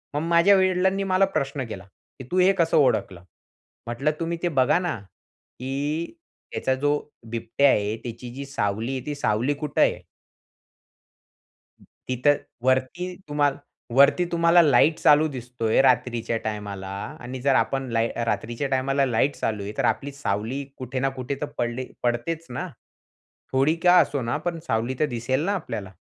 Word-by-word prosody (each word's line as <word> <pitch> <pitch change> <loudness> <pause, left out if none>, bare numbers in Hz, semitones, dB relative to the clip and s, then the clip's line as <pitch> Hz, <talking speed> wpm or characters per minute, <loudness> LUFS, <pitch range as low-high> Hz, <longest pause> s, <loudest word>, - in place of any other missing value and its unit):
मग 145 - 0
माझ्या 170 +4 +5
वडिलांनी 190 +1 +2
मला 190 0 +3
प्रश्न 135 -1 -2
केला? 95 -3 -7
की 100 +6 -16
"तू 185 - +2
हे 185 +1 +6
कसं 170 -4 +2
ओळखलं?" 95 - +1 0.6
म्हटलं 120 +6 0
तुम्ही 170 0 -2
ते - - +2
बघा 130 - +3
ना 175 -9 -2 0.6
की 145 - -3 0.4
"त्याचा 130 - 0
जो 145 +2 +1 0.4
बिबट्या 120 +5 +2
आहे, 105 -2 +1
त्याची 120 +1 -7
जी 140 +1 -6
सावली 110 -3 -2
आहे, 130 - -8
ती 150 - -3
सावली 120 +1 0
कुठे 145 0 -2
आहे?" - - +3 2.1
तिथं 130 +3 +2 0.3
वरती 130 +8 0
तुम्हाला 145 -1 +1 0.4
वरती 140 +6 +5
तुम्हाला 170 0 +5
लाईट 155 +1 +4
चालू 150 +1 +5
दिसतोय 120 -2 0
रात्रीच्या 120 -3 +1
टायमाला 100 -3 -4 0.3
आणि 125 +1 -7
जर 135 0 +3
आपण 135 0 0
लाई 115 0 +2 0.2
रात्रीच्या 120 +4 -2
टायमाला 135 +1 +1
लाईट 130 +3 +1
चालू 105 -2 -2
आहे, 100 - -5
तर - - +1
आपली 135 +6 0
सावली 130 0 -3
कुठे 130 0 -4
ना 135 +1 +1
कुठे 130 +2 -3
तर - - 0
पडले 120 +2 -2 0.2
पडतेच 125 +8 -1
ना? 125 - -4 0.9
थोडी 135 +4 +3
का 180 0 +7
असो 140 -3 0
ना, 120 +2 -1
पण 165 +2 -3
सावली 115 +3 0
तर 155 - +4
दिसेल 130 +3 -1
ना 200 - +1
आपल्याला? 115 - -5
135 Hz, 155 wpm, -24 LUFS, 120-150 Hz, 2.1 s, का